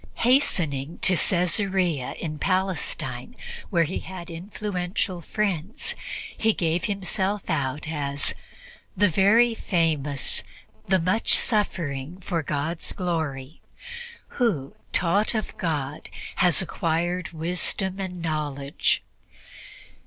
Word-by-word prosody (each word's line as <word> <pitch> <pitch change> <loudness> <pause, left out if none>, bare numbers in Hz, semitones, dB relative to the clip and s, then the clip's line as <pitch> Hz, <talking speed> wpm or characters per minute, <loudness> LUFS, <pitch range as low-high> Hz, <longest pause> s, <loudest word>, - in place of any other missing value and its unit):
Hastening 165 - +2
to 185 - +5
Caesarea 180 - +1
in 155 -2 -4
Palestine, 185 - -1 0.3
where 170 -4 +4
he 165 +4 -2
had 180 -2 -8
influential 180 0 -2
friends, 210 - -1 0.4
he 220 0 +3
gave 170 0 +1
himself 200 0 -1
out 145 -3 -1
as 145 -2 +1 0.6
"the 205 -1 +5
very 215 +7 +5
famous, 155 - +1 0.5
the 190 - +5
much 185 +6 +3
suffering 170 - -1
for 175 -2 -1
God's 155 +3 -2
glory, 160 -5 -2 0.8
who, 160 - +1 0.2
taught 200 +6 +2
of 215 - -2
God, 150 -4 -2 0.3
has 180 +1 +5
acquired 170 +1 -1
wisdom 180 +3 0
and 180 -3 -4
knowledge." 145 -3 0
175 Hz, 100 wpm, -26 LUFS, 155-190 Hz, 0.8 s, to